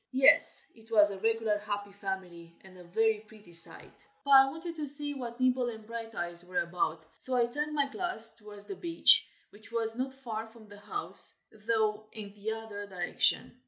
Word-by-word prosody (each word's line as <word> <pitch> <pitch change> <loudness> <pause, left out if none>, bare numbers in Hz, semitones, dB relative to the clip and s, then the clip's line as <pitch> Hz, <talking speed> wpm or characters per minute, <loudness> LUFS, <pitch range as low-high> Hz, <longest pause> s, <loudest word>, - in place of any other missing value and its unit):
Yes 265 +1 +6
it 225 0 -22
was 205 -2 +4
a 195 - -8
regular 225 -1 -1
Happy 205 -1 -6
Family, 185 -4 -8
and 190 -1 -17
a 180 - -14
very 220 +4 0
pretty 215 -4 -19
sight. 170 - +2 0.2
But 280 - -2
I 270 0 +7
wanted 330 +3 -8
to 300 -1 -5
see 290 +1 +7
what 245 -3 -8
Nibble 255 -1 0
and 220 -2 -11
Brighteyes 215 -7 -7
were 180 0 -8
about, 165 -2 -4
so 260 - -5
I 240 -1 +2
turned 295 +5 -5
my 285 -1 +1
glass 275 - -2
towards 210 -2 -15
the 395 - -8
beach, 335 -2 +4 0.2
which 215 +2 -16
was 225 -1 -3
not 265 +2 -5
far 225 -4 -7
from 220 -1 -18
the 205 0 -14
house, 410 - +2 0.2
though 215 -1 -2
in 205 -2 -10
the 210 +1 -6
other 220 -2 -8
direction. 180 -3 +1
220 Hz, 190 wpm, -29 LUFS, 205-255 Hz, 0.2 s, I